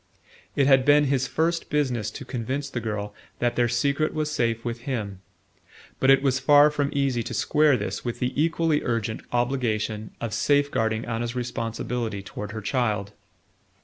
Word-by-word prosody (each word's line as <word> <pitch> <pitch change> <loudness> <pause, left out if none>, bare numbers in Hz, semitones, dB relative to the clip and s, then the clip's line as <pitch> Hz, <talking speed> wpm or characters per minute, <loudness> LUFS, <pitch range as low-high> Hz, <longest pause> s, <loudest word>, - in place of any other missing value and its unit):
It 140 - +3
had 135 -1 +5
been 145 +1 +5
his 135 -2 +1
first 170 +1 -1
business 130 -7 0
to 135 - -9
convince 135 +3 -3
the 120 - -2
girl 105 -2 -4 0.2
that 120 0 0
their 120 -1 +3
secret 140 +6 0
was 155 -1 -1
safe 115 -4 -1
with 120 0 -3
him; 100 -7 -3 0.8
but 135 - +3
it 135 0 +6
was 130 -2 +2
far 145 +1 +6
from 145 -1 0
easy 135 -4 0
to - - -5
square 150 -3 +3
this 105 - -4
with 120 -2 -3
the 125 +1 -1
equally 160 0 +1
urgent 115 -2 -2
obligation 115 -4 -1
of 115 -2 -4
safe 145 +4 +2
guarding 110 0 0
Anna's 115 +1 -3
responsibility 115 -3 -3
toward 105 +1 -7
her 110 0 -5
child. 105 -3 -1
125 Hz, 170 wpm, -25 LUFS, 115-140 Hz, 0.8 s, it